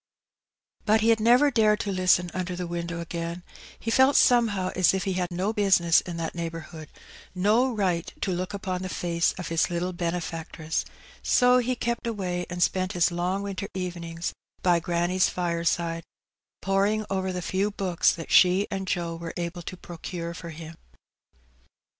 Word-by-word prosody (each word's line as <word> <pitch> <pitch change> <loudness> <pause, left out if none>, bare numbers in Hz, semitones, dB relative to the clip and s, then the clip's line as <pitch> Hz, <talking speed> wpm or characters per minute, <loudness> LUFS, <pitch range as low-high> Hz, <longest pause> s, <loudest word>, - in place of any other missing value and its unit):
But 220 +1 +3
he 225 - +3
had 225 -1 +4
never 245 +6 +5
dared 215 -3 +3
to 200 - -2
listen 180 -2 +2
under 180 -1 -3
the 180 0 -4
window 170 0 -4
again; 170 +1 -5 0.4
he 225 - -3
felt 265 +4 +5
somehow 220 -7 +4
as 185 0 +4
if 190 - -1
he 190 - -1
had 180 -1 -1
no 185 +5 -1
business 190 -5 +4
in 175 -2 -7
that 165 -1 -3
neighbourhood, 165 -2 -6 0.5
no 215 +8 +3
right 185 -6 -1
to 195 - 0
look 185 +2 -2
upon 190 -2 -3
the 185 - -4
face 170 -2 0
of 180 -3 -6
his 165 -1 +1
little 175 +1 -2
benefactress; 165 -2 -3 0.4
so 250 0 +4
he 250 +1 0
kept 235 0 -2
away 180 -5 -3
and 175 0 0
spent 185 +1 0
his 175 0 +2
long 180 +3 -1
winter 200 0 -4
evenings 170 -2 -4 0.3
by 175 -2 +4
granny's 175 +2 +1
fireside, 170 -1 -1 0.6
poring 200 +3 +1
over 190 -1 -1
the 180 -1 -4
few 195 +4 0
books 190 -4 +1
that 165 - -7
she 185 +2 +5
and 190 -1 -3
Joe 170 -2 -2
were 165 0 -7
able 175 0 -4
to 185 +2 -7
procure 170 0 -6
for 170 0 -8
him. 160 0 -9
180 Hz, 170 wpm, -26 LUFS, 170-200 Hz, 0.6 s, never